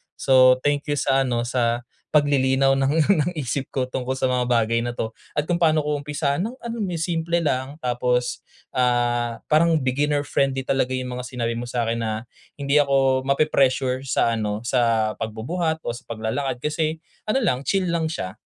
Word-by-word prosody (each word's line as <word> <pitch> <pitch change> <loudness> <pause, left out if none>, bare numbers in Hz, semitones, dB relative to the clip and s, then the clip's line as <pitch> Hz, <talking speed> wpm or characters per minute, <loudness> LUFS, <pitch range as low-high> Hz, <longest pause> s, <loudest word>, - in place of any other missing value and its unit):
So, 130 -1 +5
thank 145 +1 0
you 145 - 0
sa 135 0 +2
ano, 120 -2 0
sa 120 -1 0 0.3
paglilinaw 135 -2 +3
ng 155 +4 +2
isip 140 -2 -2
ko 130 -1 -1
tungkol 130 0 -2
sa 130 -1 0
mga 125 -1 +1
bagay 115 -1 +2
na 120 - -3
'to, 110 -1 -3 0.2
at 150 +3 -2
kung 175 - +2
paano 160 -2 +3
ko 150 0 -1
umpisahan 145 +4 -1
ng 240 - -5
ano 235 -1 -5
mo 200 - -1
yun, 165 - -3
simple 170 0 0
lang, 135 -2 -1
tapos, 125 0 -1 0.3
ah, 120 -2 +1
parang 165 +2 +4
beginner 145 +3 +1
friendly 135 -2 0
talaga 130 -1 0
yung 130 -1 -3
mga 125 - -5
sinabi 120 -2 -3
mo 120 - -4
sa'kin 115 -1 -1
na, 110 -1 -2 0.3
hindi 140 0 +1
ako 135 -2 +2
mape-pressure 135 -2 +2
sa 115 -3 +1
ano, 105 0 -2
sa 115 -3 +2
pagbubuhat 160 +9 -2
o - - -3
sa 120 - -10
paglalakad, 120 +3 -3
kasi 155 +1 -1 0.3
ano 215 +5 +2
lang, 130 - 0
chill 190 -2 +1
lang 170 -1 0
siya. 95 - -5
130 Hz, 180 wpm, -23 LUFS, 120-150 Hz, 0.3 s, So